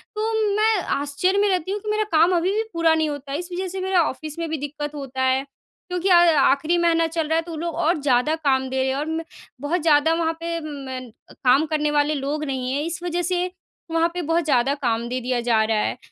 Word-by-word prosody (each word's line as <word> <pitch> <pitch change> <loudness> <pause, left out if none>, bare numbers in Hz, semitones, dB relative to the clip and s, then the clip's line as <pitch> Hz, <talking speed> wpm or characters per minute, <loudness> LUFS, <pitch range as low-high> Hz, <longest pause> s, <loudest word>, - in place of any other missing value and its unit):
तो 440 +1 -1 0.2
मैं 440 +1 +3
आश्चर्य 290 +8 0
में 410 - +3
रहती 370 0 -1
हूँ 415 - -2
कि 425 - -5
मेरा 430 0 +1
काम 330 +3 +5
अभी 350 +2 +1
भी 440 - 0
पूरा 335 -1 +3
नहीं 315 -1 +1
होता 285 -1 -6
है, 285 - -1
इस 355 +1 -7
वजह 370 +1 -2
से 375 +1 -5
मेरा 375 -1 +2
ऑफ़िस 305 +4 -7
में 335 - -2
भी 320 - -2
दिक्क़त 295 +1 -5
होता 265 -2 -5
है। 260 +1 +2 0.5
क्योंकि 360 +1 -1
अ, 355 - +7
आख़िरी 320 -1 +4
महीना 330 -1 +2
चल 325 -1 -2
रहा 320 - +1
है, 325 - +2
तो 335 +1 -10
वो 320 - -5
लोग 335 0 -3
और 335 0 +1
ज़्यादा 275 +2 +2
काम 270 -4 +1
दे 265 0 -1
रहे 265 - +1
हैं 265 - -1
और 295 - -2
मैं 320 +1 -3 0.4
बहुत 320 +4 -1
ज़्यादा 310 0 +4
वहाँ 330 0 0
पे 335 0 -2 0.5
म - - -19 0.3
काम 265 +5 +4
करने 300 -1 0
वाले 295 +1 +2
लोग 290 +2 -3
नहीं 260 -2 -3
हैं, 285 - 0
इस 335 0 -3
वजह 350 0 -1
से 355 +1 0 0.5
वहाँ 330 +1 +2
पे 355 - -3
बहुत 330 +1 +1
ज़्यादा 270 -2 +2
काम 235 0 0
दे 255 - -2
दिया 250 0 -1
जा 230 -2 +2
रहा 215 - +2
है। - - -1
320 Hz, 250 wpm, -23 LUFS, 280-345 Hz, 0.5 s, अ